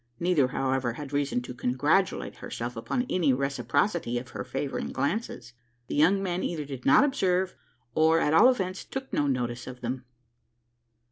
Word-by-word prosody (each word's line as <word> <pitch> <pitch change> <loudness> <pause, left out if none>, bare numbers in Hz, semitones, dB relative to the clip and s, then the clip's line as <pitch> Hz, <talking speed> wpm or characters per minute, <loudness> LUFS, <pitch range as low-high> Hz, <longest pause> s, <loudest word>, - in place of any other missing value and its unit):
Neither, 170 -7 +3
however, 130 -2 -1
had 145 +2 -8
reason 140 -3 0
to 125 - -7
congratulate 145 +10 0
herself 120 +1 -5
upon 245 - -2
any 160 -7 +2
reciprocity 135 - 0
of 120 +1 -6
her 100 -3 -5
favouring 140 +5 -3
glances. 140 - -3 0.3
The - - -5
young 180 +7 +4
man 180 -1 -1
either 155 -4 -2
did 135 -3 -6
not 140 - +7
observe, 190 -10 +1 0.4
or, 160 +1 +4
at 150 - +1
all 220 +10 +8
events, 190 -7 -1
took 265 0 -7
no 145 - +2
notice 120 -2 -2
of 125 0 -8
them. 125 +1 -4
145 Hz, 160 wpm, -28 LUFS, 125-180 Hz, 0.4 s, all